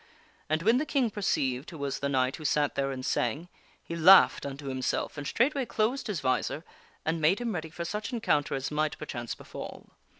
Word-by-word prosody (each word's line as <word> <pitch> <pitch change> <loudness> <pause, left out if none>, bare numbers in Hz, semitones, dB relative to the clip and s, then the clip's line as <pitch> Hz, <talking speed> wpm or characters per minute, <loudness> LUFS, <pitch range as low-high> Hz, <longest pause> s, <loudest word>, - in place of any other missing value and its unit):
And 155 +1 0
when 230 +5 +4
the 305 - -1
King 265 -6 +1
perceived 135 -10 -1
who 165 - -9
was 140 -2 -3
the 140 - -1
knight 130 -1 +1
who 155 - -10
sat 150 -1 +1
there 135 0 0
and 130 -1 -5
sang, 150 +9 -1 0.3
he 170 - -6
laughed 175 -2 +7
unto 140 +1 -7
himself 130 -1 -2
and 145 -1 -5
straightway 270 +3 +2
closed 220 +7 0
his 195 -8 -2
visor 135 +4 0 0.4
and 160 0 0
made 165 +6 +4
him 235 -2 -2
ready 160 -2 -4
for 170 +2 -6
such 210 +7 -4
encounter 150 - +1
as 135 +1 -3
might, 155 0 0
perchance, 120 -6 -5
befall. - - -9
155 Hz, 200 wpm, -29 LUFS, 140-205 Hz, 0.4 s, laughed